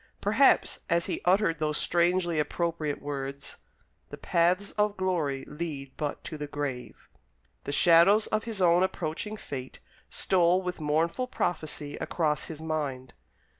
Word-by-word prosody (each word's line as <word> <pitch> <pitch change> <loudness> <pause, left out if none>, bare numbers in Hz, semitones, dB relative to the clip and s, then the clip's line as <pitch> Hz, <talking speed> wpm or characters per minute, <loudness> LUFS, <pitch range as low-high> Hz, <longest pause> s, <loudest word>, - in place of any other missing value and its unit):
Perhaps 240 +7 +3
as 170 0 +2
he - - -3
uttered 180 -3 +3
those 150 -1 0
strangely 175 -1 +1
appropriate 160 -1 -1
words: 140 -1 -5 0.5
"The - - -8
paths 180 +4 +1
of 210 -1 0
glory 165 -8 -1
lead 150 -4 -6
but 150 -2 -4
to 155 -2 -7
the 150 - -4
grave," 140 -4 -5 0.6
the - - -3
shadows 175 +8 +6
of 215 0 -1
his 215 -5 -2
own 175 0 +5
approaching 190 +3 -2
fate 130 -9 -7 0.3
stole 180 0 +2
with 180 -2 -4
mournful 165 +11 0
prophecy 155 - -3
across 150 -4 -1
his 160 -2 -8
mind. 145 -5 -3
165 Hz, 135 wpm, -28 LUFS, 150-185 Hz, 0.6 s, shadows